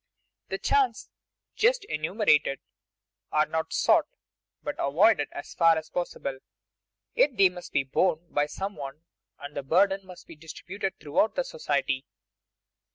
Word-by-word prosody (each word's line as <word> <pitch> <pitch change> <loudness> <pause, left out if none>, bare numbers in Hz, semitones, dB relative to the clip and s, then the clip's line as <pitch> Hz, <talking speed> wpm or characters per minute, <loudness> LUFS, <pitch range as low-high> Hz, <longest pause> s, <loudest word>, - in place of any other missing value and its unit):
The - - -2
chances 420 -2 +1 0.4
just 485 0 +2
enumerated 155 - +1 0.7
are 155 0 +3
not 160 0 -3
sought, - - +3 0.6
but - - -2
avoided 150 +3 +3
as 145 - -8
far 165 -2 +4
as 160 - -6
possible; 140 -6 -4 0.7
yet 300 - +2
they 195 -1 +6
must 180 -1 -10
be - - +2
borne 165 +5 +1
by 145 0 +1
some 195 +6 -5
one, 140 +2 -8 0.3
and 145 +1 -9
the 140 - -2
burden 195 +7 +2
must 180 -1 -12
be 165 - -12
distributed 185 +5 -6
throughout 150 +9 +1
society. 455 - -2
170 Hz, 135 wpm, -27 LUFS, 145-200 Hz, 0.7 s, they